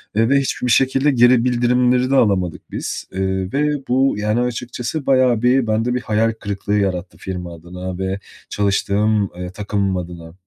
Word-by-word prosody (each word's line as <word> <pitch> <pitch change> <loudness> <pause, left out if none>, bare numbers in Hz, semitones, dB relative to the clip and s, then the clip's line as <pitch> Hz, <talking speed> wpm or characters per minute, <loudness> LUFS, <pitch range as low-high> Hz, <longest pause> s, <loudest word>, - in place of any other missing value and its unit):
eee, 115 +2 +3
ve 140 0 +4
hiçbir 130 -2 -2
şekilde 135 +3 +3
geri 120 -1 +5
bildirimleri 125 +1 +2
de - - +3
alamadık 95 -9 +1
biz, - - -5
eee, 95 0 -2
ve 150 +1 +1
bu, 130 +2 +2
yani, 105 +2 0
açıkçası 125 +4 -3
bayağı 130 -4 +3
bir 125 0 +3
bende 115 +3 0
bir 125 - -1
hayal 115 0 +1
kırıklığı 100 -1 -6
yarattı 95 -2 -2
firma 90 -2 -6
adına 90 +2 -7
ve 95 +1 -3 0.3
çalıştığım, 100 +1 +1
eee, 90 0 -5
takımım 100 -1 -1
adına. 85 -2 -8
110 Hz, 160 wpm, -19 LUFS, 95-125 Hz, 0.3 s, geri